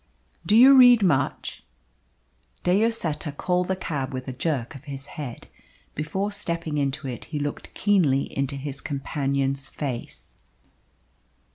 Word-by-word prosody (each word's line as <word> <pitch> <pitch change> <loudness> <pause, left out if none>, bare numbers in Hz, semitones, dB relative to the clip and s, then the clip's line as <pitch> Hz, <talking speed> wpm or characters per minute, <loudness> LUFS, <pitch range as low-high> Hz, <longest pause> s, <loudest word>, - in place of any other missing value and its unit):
"Do 210 - +4
you 260 +4 +9
read 245 -4 +8
much?" 145 -7 0 1.0
De 180 - +3
Lloseta 185 -9 0
called 180 +5 0
the 190 - 0
cab 145 -7 -4
with 130 0 -5
a 130 - -4
jerk 135 -2 -2
of 135 +1 -12
his 135 -2 -7
head. 140 -7 -7 0.5
Before 190 +7 -2
stepping 170 -7 -3
into 140 0 -2
it 125 -2 -6
he 155 - -5
looked 145 0 -4
keenly 170 -10 +3
into 140 0 -1
his 140 0 -6
companion's 135 -1 -2
face. 130 -5 -6
145 Hz, 135 wpm, -25 LUFS, 135-180 Hz, 1.0 s, you